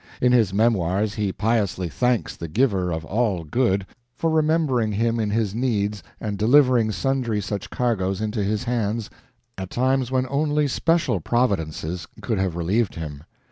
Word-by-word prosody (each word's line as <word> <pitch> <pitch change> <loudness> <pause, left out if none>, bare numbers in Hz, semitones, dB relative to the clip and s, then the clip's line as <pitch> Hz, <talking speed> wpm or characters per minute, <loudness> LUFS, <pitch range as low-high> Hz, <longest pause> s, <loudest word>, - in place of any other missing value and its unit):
In 125 - +3
his 115 -6 +4
memoirs 100 -1 +1
he 105 -3 -1
piously 105 -4 0
thanks 125 +7 0
the 85 - -6
Giver 95 - +1
of 80 0 -3
all 105 -5 0
Good 100 - +1 0.3
for 165 - 0
remembering 155 -8 +2
him 115 +2 0
in 110 -2 0
his 105 -2 0
needs 105 -4 -1 0.2
and 105 -2 -4
delivering 125 -1 +4
sundry 125 -3 -1
such 100 0 -4
cargoes 95 -6 -1
into 105 0 -1
his 105 +3 -1
hands 115 -3 -2 0.5
at 95 -1 -5
times 130 +2 +1
when 130 0 +1
only 150 +2 +1
special 165 - +1
providences 85 -6 -1
could 110 -5 -2
have 95 -3 -1
relieved 95 +6 0
him. 75 -2 -7
110 Hz, 155 wpm, -23 LUFS, 95-125 Hz, 0.5 s, his